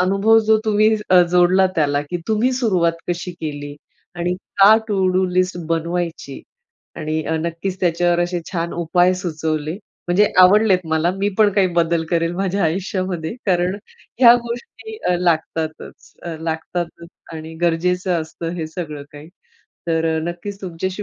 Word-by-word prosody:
अनुभव 195 +4 +4
जो 220 0 +5
तुम्ही 215 0 +3 0.2
अ, 180 -1 +7
जोडला 180 +2 +4
त्याला 145 -2 +2
की 145 +5 -4
तुम्ही 220 +4 +2
सुरुवात 190 -10 +1 0.2
कशी 175 +1 -3
केली 145 -2 -5 0.4
आणि 175 +1 -1 0.3
का 205 +3 +8
टू 195 -3 +1
डू 185 +1 +2
लिस्ट 185 0 +1
बनवायची. 165 -3 -3 0.6
आणि 155 +1 -2
अ, 160 - -1
नक्कीच 170 +3 -3
अ, - - -33
त्याच्यावर 175 0 +2
असे 175 0 -1
छान 170 -2 -2
उपाय 175 +2 +2
सुचवले. 160 -3 -3 0.3
म्हणजे 190 +4 +4
आवडलेत 190 +1 +6
मला, 160 +2 +1
मी 200 +1 +1
पण 215 -1 +5
काही 195 -1 +3
बदल 165 -1 +2
करेल 165 -1 +1
माझ्या 195 +2 -1
आयुष्यामध्ये 185 0 -2
कारण 180 0 +1 0.5
ह्या 240 -2 +9
गोष्टी 240 - -8 0.3
लागतातच, 160 -1 -2
अ, 170 -2 -5
लागतातच 170 +1 -4 0.2
आणि 160 0 -8
गरजेचं 180 +1 +1
असतं 160 +1 -6
हे 160 -2 -3
सगळं 155 -3 -6
काही 145 +2 -12 0.6
तर 165 0 +1 0.2
नक्कीच 175 +4 -6
तुमच्याशी 185 +2 -4
175 Hz, 145 wpm, -20 LUFS, 165-190 Hz, 0.6 s, ह्या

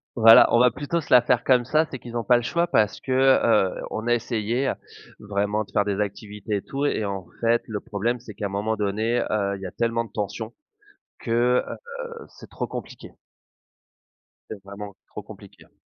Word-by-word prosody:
Voilà, 115 -1 +8
on 120 - +5
va 125 +1 +6
plutôt 145 +7 -3
se - - -14
la 125 -1 +7
faire - - +2
comme 125 -2 +3
ça. 155 +5 +2
C'est 130 - -6
qu'ils 120 -1 -10
ont 120 - -1
pas 125 0 +4
le 120 - -2
choix 170 +8 0
parce 110 - +1
que, 130 - -5
heu, 130 -7 +3
on 110 - -5
a 120 - +4
essayé 120 +2 -1 0.5
vraiment 105 +1 -1
de - - -18
faire 100 - +1
des 100 -1 -2
activités 105 0 -3
et - - -4
tout 140 +6 -3
et 125 - 0
en 100 -3 -4 0.2
fait 115 0 +2
le 105 -2 -4
problème, 115 +5 -2
c'est 110 -3 -11
qu'un 100 - -3
moment 100 +3 -2
donné, 110 +3 0
heu, 100 -2 0
il 95 - -10
y - - -6
a 90 - -5
tellement 115 0 -1
de 110 - -16
tension 105 +2 -4 0.7
que, 120 +1 +2
heu, 475 - -9 0.4
c'est - - -15
trop - - -4
compliqué. - - -8 1.4
C'est 100 -3 -8
vraiment 100 0 -9
trop - - -9
compliqué, - - -14
hein. - - -29
110 Hz, 205 wpm, -24 LUFS, 105-120 Hz, 1.4 s, Voilà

